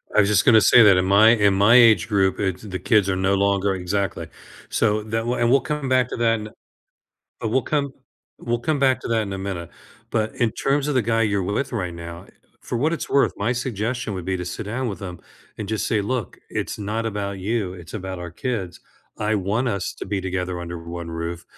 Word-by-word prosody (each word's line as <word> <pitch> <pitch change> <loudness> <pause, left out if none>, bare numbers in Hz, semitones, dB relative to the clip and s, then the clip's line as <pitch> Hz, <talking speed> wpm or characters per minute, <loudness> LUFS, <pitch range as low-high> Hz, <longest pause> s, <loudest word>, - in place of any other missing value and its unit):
I 105 - +6
just 105 0 +3
gonna 110 -4 +7
say 120 - +7
that 100 -3 +6
in 90 - +2
my 100 +3 +6
in 105 -4 +4
my 100 +5 +5
age 115 -3 +6
group, 95 -3 +1
eh 95 -2 +1 0.2
the 95 -2 -4
kids 100 0 +2
are 95 - +1
no 95 +1 +1
longer 100 0 +1
exactly. 95 +1 -2 0.4
So 105 -1 +1
that 115 +1 -2
will 120 +1 0
and 120 0 +2
we'll 135 -2 +5
come 150 +1 -3
back 130 -1 +3
to - - -5
that 115 -1 +2
in 105 - -7
a - - -13 0.9
and 110 - -1
we'll 130 - +2
come 140 -2 -1 0.5
we'll 120 0 -2
come 150 +4 -1
back 130 -1 +3
to - - -6
that 115 -1 +1
in 100 -2 -5
a 95 - -4
minute. 95 -4 -5 0.4
But 110 -1 -1
in 120 -2 +1
terms 140 +1 0
of 145 - 0
the 125 - +3
guy 115 +1 +1
you're 100 -3 +1
with 115 +8 -2
right 90 -7 -3
now, 85 0 -9 0.3
for - - -4
what 155 +7 +1
it's 165 - -3
worth, 140 - +3
my 110 +5 0
suggestion 120 -2 -3
would 90 -2 -5
be 95 0 -1
to 90 - -5
sit 95 +4 -5
down 120 +4 -3
with 100 -3 -6
him 90 -3 -7 0.4
and 105 -2 -6
just 110 -1 -1
say, 110 -2 +1
"Look, 120 +3 -3
it's - - -3
not 110 +3 -3
about 100 -2 -3
you. 100 -1 -2
It's 85 +2 -11
about 95 -3 -5
our 85 -1 -7
kids. 100 -2 -4 0.4
I 105 +1 0
want 105 +6 0
us 100 -5 -3
to - - -6
be 100 -1 -2
together 90 -1 -3
under 85 0 -6
one 85 0 -7
roof, 85 +1 -5
105 Hz, 235 wpm, -22 LUFS, 95-115 Hz, 0.9 s, gonna